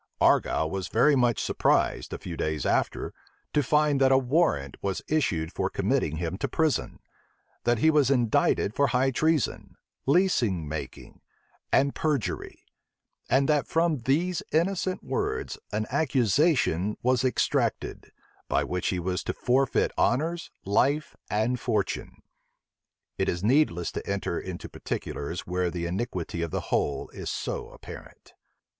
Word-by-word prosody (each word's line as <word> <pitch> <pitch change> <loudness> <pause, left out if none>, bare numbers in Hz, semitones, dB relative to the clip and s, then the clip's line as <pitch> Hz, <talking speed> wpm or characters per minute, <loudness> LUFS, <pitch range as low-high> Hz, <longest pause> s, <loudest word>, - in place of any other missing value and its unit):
Argyle 80 - +3
was 95 +2 -4
much 125 -2 +4
surprised, - - +1
a - - -3
few 85 - -7
days 80 -2 -2
after, - - 0 0.4
to 150 - +3
find 150 -2 +2
that 135 0 +5
a 130 - +6
warrant 130 - +1
was 95 -1 -2
issued 90 - 0
for - - -1
committing 75 - 0
him 85 +3 -3
to - - -1
prison; 160 -3 0 0.7
that 120 0 +3
he 160 +8 +4
was 145 -4 +3
indicted 120 -5 +2
for 140 +2 +3
high 130 +1 +2
treason, 155 +2 0 0.3
leasing 125 - +2
making, 75 +1 -7 0.5
and 140 +1 +3
perjury; 150 -8 -2 0.6
and 135 +2 +3
that 150 -2 +2
from 165 -1 +2
these 155 +8 0
innocent 185 +3 0
words - - -2
an 110 +1 -1
accusation 130 - +2
was 125 0 +2
extracted, 130 - 0 0.4
by - - +2
which 90 -1 -2
he 95 - 0
was 90 +1 -2
to - - -2
forfeit 130 +1 +1
honors, 165 +5 +1 0.2
life, 140 +10 +1
and 110 +4 0
fortune. 105 -5 -2 1.0
It - - +1
is 85 +1 -2
needless 110 - +2
to - - -6
enter 100 -3 -1
into 90 -2 -6
particulars 85 +5 -4
where 90 0 0
the 85 0 -4
iniquity 90 -2 -3
of 85 - -2
the - - -2
whole 70 -2 0
is - - -6
so - - -4
apparent. - - -12
125 Hz, 140 wpm, -27 LUFS, 90-150 Hz, 1.0 s, a